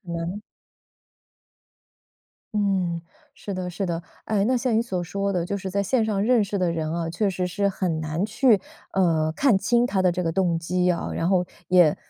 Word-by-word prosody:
可 170 - -8
能 170 +5 -4 2.1
嗯， 185 -5 0 0.3
是 200 - -7
的， 185 -1 -3
是 195 +3 -3
的。 170 -1 -2 0.2
哎， 205 -2 +1
那 255 +2 +2
像 240 -2 0
你 225 - +4
所 185 -7 -2
说 200 +3 -2
的， 175 -2 0
就 200 +3 -2
是 190 -1 -5
在 200 +1 0
线 230 +2 +1
上 205 -2 0
认 235 -1 +4
识 200 0 -2
的 180 -2 +1
人 160 -2 -2
啊， 165 -1 -2
确 205 +4 0
实 180 -1 -1
是 200 +3 0
很 180 -4 -1
难 155 +4 -2
去， 220 -1 +3 0.3
呃， 160 -4 +2
看 250 - +3
清 240 +3 +2
他 195 -5 0
的 185 -1 +4
这 180 - -2
个 165 - 0
动 175 -3 +1
机 180 +2 +1
啊， 170 - -2
然 165 - -1
后 185 -2 +3 0.2
也 180 -4 +5
185 Hz, 215 characters per minute, -24 LUFS, 170-205 Hz, 2.1 s, 也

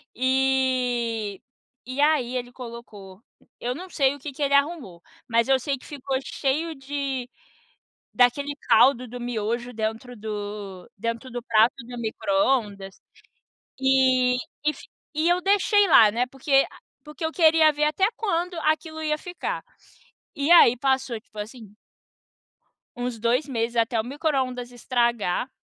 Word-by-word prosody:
e 250 -5 0 0.4
e 255 +3 -6
aí 290 -5 +2
ele 245 -1 -4
colocou 230 -6 -11 0.4
eu 245 +1 -2
não 360 +7 -9
sei 275 -5 +2
o 285 - -11
que 285 +2 -6
que 280 +2 -4
ele 280 0 +1
arrumou, 280 - 0 0.3
mas 230 0 +2
eu 265 -1 +4
sei 275 +2 -2
que 255 - -17
ficou 275 -2 -3
cheio 310 +6 -2
de 270 -2 -4 0.9
daquele 280 +4 +2
caldo 245 +2 +5
do 245 +1 -8
miojo 240 +1 -3
dentro 225 +2 -4
do 205 -2 -7
dentro 230 +4 -4
do 245 0 -5
prato 225 -1 +3
do 245 0 -8
microondas. 200 -2 -1 0.8
E 260 -2 +3 0.3
fi - - -14 0.3
e 310 +3 +1
eu 355 +1 +2
deixei 410 +1 +3
lá, 220 -8 +7
né, 240 +4 0
porque 270 +1 +2 0.4
porque 300 +2 -8
eu 320 - -1
queria 320 -2 +5
ver 300 +1 0
até 310 +6 +2
quando 360 -4 -1
aquilo 315 0 -1
ia 305 -1 0
ficar. 355 +2 -5 0.7
E 285 0 -1
aí 290 -8 +8
passou 260 -2 0
tipo 215 -1 -17
assim 215 -1 -8 1.2
uns 245 -1 -4
2 240 +6 +1
meses 235 -3 -2
até 230 0 +2
o - - -4
microondas 255 -3 -2
estragar 240 -2 0
255 Hz, 140 wpm, -24 LUFS, 230-285 Hz, 1.2 s, aí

